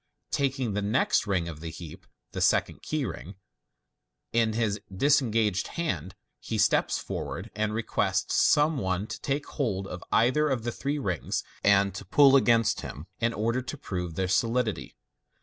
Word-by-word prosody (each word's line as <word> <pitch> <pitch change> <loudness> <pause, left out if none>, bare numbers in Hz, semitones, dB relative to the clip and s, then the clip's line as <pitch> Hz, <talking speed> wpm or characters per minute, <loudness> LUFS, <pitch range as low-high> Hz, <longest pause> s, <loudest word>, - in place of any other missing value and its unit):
Ta^ 135 -1 0
ing 120 -5 -1
the 105 - -1
next 105 +1 +1
ring 90 -4 0
of 80 -3 -7
the 80 +1 -6
heap 80 -1 -10 0.2
(the - - -4
second - - +2
key 155 -3 -2
ring) 95 -1 -7 1.0
in 115 -1 +2
his 110 -2 -1
disenofa^ed 115 - +2
hand, 160 - -3 0.2
he - - -4
steps - - +2
forward, - - -5
and 105 0 -1
requests 115 0 0
some 150 0 +4
one 95 -1 -1
to - - -7
take 140 +1 -1
hold 100 -9 -2
of 90 -2 -7
either 150 +6 +3
of 130 -5 -1
the 120 - -2
three 140 +5 -2
rings, 95 - -2 0.2
and 100 -1 +4
to 100 - -7
pull 135 +8 +6
against 115 -5 +3
him, 70 +4 -8
in 115 0 +1
order 115 +3 -1
to 130 +4 -6
prove 90 - -5
their 95 +1 0
solidity. 115 - 0
110 Hz, 165 wpm, -27 LUFS, 95-130 Hz, 1.0 s, pull